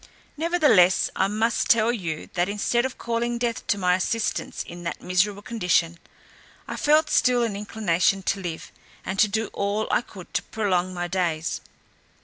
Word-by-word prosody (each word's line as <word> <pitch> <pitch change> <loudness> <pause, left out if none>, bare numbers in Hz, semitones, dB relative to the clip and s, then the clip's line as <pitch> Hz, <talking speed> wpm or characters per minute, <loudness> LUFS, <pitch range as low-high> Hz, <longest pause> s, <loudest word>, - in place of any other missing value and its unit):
Nevertheless, 300 - +4
I 190 - +2
must 220 +3 0
tell 230 0 +5
you, 165 -9 -4
that 175 +1 0
instead 225 +4 0
of 260 - -12
calling 235 0 -2
death 235 -1 -2
to 205 - +2
my 180 -2 +2
assistance 215 +5 -1
in 175 0 -10
that 170 - -4
miserable 195 +3 0
condition, 180 -7 0 0.7
I - - -4
felt 305 +1 +3
still 250 -1 +3
an 225 -4 -2
inclination 195 -2 0
to 195 +1 -1
live, 170 -3 -6 0.3
and 190 +1 -3
to 215 - +6
do 220 +1 -2
all 205 +2 -1
I - - +3
could 190 -6 -13
to 200 - +1
prolong 185 -5 -1
my 175 -1 -3
days. 170 -3 -1
200 Hz, 165 wpm, -24 LUFS, 180-230 Hz, 0.7 s, to